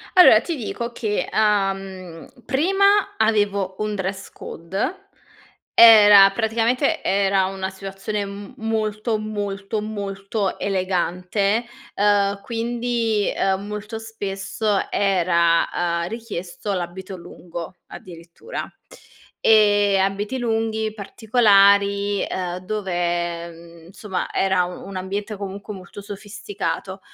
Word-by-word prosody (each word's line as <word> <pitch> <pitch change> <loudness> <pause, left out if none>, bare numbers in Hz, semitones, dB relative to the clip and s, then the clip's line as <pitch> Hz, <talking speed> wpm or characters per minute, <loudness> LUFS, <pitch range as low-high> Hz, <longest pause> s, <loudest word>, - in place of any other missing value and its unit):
Allora 290 -12 +8
ti 330 0 -4
dico 235 +1 -4
che, 215 -3 -2
uhm, 195 -5 -1 0.2
prima 390 +8 +2
avevo 205 -3 +1
un 215 -1 -2
dress 190 0 -4
code. 255 - -5 0.7
Era 210 -3 +9
praticamente 235 +8 0
era 195 -1 +2
una 190 0 -4
situazione 195 +2 -5
m 200 0 -9
molto, 220 0 -1
molto, 205 0 -4
molto 200 -1 -3
elegante. 190 +3 0 0.3
Uhm, 200 -1 +2
quindi, 230 -1 -1
uhm, 195 +1 0
molto 210 +1 -6
spesso 205 -1 -2
era, 170 -4 +2 0.4
uhm, 170 - -3
richiesto 205 -3 -5
l'abito 185 +2 -5
lungo, 170 0 -9
addirittura. 170 - -9 0.7
Ehm, 205 -2 +4
abiti 205 +6 -2
lunghi, 225 -2 -1
particolari, 200 -2 +3
uhm, 180 -1 -3
dove, 175 -4 -2
mhmm, 170 0 -15
insomma, 190 +1 -5
era 190 -2 +2
u 180 0 -8
un 195 -1 -7
ambiente 200 +3 -4
comunque 200 +1 -7
molto 190 +1 -10
sofisticato. 200 -2 -5
200 Hz, 100 wpm, -22 LUFS, 190-220 Hz, 0.7 s, Era